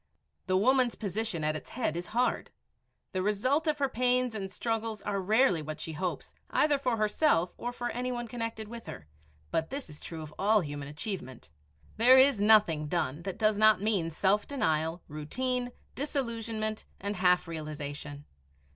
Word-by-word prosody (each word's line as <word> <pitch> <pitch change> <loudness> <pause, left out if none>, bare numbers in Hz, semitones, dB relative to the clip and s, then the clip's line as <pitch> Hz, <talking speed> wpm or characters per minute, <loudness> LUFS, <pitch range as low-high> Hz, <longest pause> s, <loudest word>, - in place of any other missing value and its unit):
The 185 0 +3
woman's 250 +3 +3
position 210 -4 -2
at 155 0 +1
its 155 - -7
head 230 -10 -2
is 175 +1 -4
hard. 245 +3 0 0.6
The 185 - -1
result 255 - +1
of 300 -1 +2
her 280 -1 +1
pains 250 -1 +1
and 195 -3 -5
struggles 225 +1 -2
are 200 -1 -1
rarely 210 -3 +3
what 155 0 -6
she 160 - -5
hopes, 180 +3 -4 0.2
either 295 -2 +3
for 250 -4 0
herself 215 - +2
or 245 - -4
for 240 0 -4
any 250 +1 -2
one 240 -1 -3
connected 230 -2 -4
with 230 +1 -9
her, 75 - -8 0.5
but 160 0 0
this 270 - -5
is 150 - -9
true 160 -2 -7
of 155 0 -10
all 210 +2 +4
human 145 -3 -5
achievement. 145 - -6 0.5
There 250 +4 +7
is 260 -5 +5
nothing 205 -8 +5
done 150 -2 -1
that 190 +1 -5
does 215 -2 +2
not 215 -2 +6
mean 200 -5 +1
self 195 +5 +1
denial, 165 - 0
routine, 245 - -2 0.2
disillusionment, 230 -6 -3 0.2
and 200 0 -3
half 180 -1 +3
realization. 150 -2 -6
210 Hz, 170 wpm, -30 LUFS, 165-240 Hz, 0.6 s, There